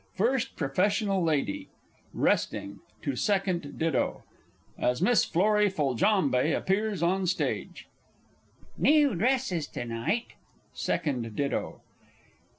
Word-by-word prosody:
FIRST 250 +5 0
PROFESSIONAL 195 +5 +1
LADY, 150 -10 -1 0.4
"resting," 100 0 0 0.2
to 140 - -2
SECOND 185 - -1
DITTO 160 -5 0 0.6
(as 125 0 +1
MISS 215 +6 +3
FLORRIE 210 +4 +3
FOLJAMBE 150 - +2
appears 200 -2 0
on 185 +2 +1
Stage). 185 - -2 0.9
New 295 -4 +4
dresses 210 - 0
to - - -6
night. 120 - -2 0.4
SECOND 120 -7 -2
DITTO. 140 -1 -2
185 Hz, 95 wpm, -28 LUFS, 140-210 Hz, 0.9 s, New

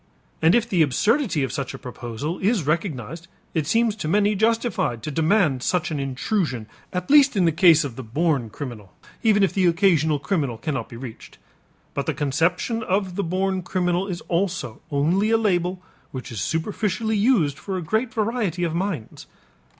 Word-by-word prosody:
And 160 +2 +5
if 235 -1 +2
the 185 -7 +2
absurdity 190 - +2
of 135 - -2
such 140 -3 -4
a - - -7
proposal 125 +6 -5
is 200 - +1
recognized 160 - -2 0.3
it 155 -3 -1
seems 225 +2 +2
to 155 - -4
many 205 +5 +3
justified 220 - 0
to 150 - -3
demand 160 - +2
such 175 +4 0
an 150 - -2
intrusion 135 - -1 0.3
at 180 +5 -3
least 285 -4 +6
in 185 - +4
the 165 - +4
case 160 -1 +5
of 135 -5 -5
the - - -4
born 135 0 0
criminal, 110 -6 -8 0.3
even 210 -3 +4
if 195 - +2
the 190 -2 +3
occasional 165 -4 +3
criminal 140 - -1
cannot 135 -4 -3
be 115 - -9
reached. 120 -2 -10 0.6
But 140 -1 -3
the 160 - 0
conception 165 - 0
of 190 -3 -1
the 200 - -1
born 190 +2 -1
criminal 180 0 0
is 180 -3 -4
also 180 - -2
only 165 +9 +1
a 225 - +4
label 180 -4 0 0.3
which 130 -2 -7
is 110 -5 -4
superficially 210 - -1
used 200 - +2
for 195 -2 -4
a 180 - -4
great 220 +8 0
variety 215 -6 -1
of 165 -2 -1
minds. 170 - -4
175 Hz, 180 wpm, -23 LUFS, 145-200 Hz, 0.6 s, least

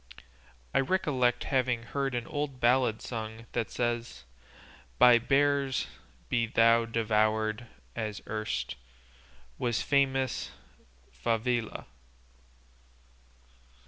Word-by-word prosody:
I - - +4
recollect 130 -5 +1
having 125 -3 0
heard 135 +2 -2
an 120 -1 -2
old 145 -3 -4
ballad 120 -2 +2
sung 110 -1 -6
that 115 -2 -2
says, 120 -1 -3 0.7
By 120 -1 +7
bears 140 +1 +2 0.4
be 115 - +1
thou 115 0 +4
devoured, 110 0 0 0.3
as 110 -3 -3
erst 110 - -3 0.8
Was 120 -2 0
famous 135 -2 +1 0.6
Favila." 115 0 -1
120 Hz, 85 wpm, -29 LUFS, 115-130 Hz, 0.8 s, By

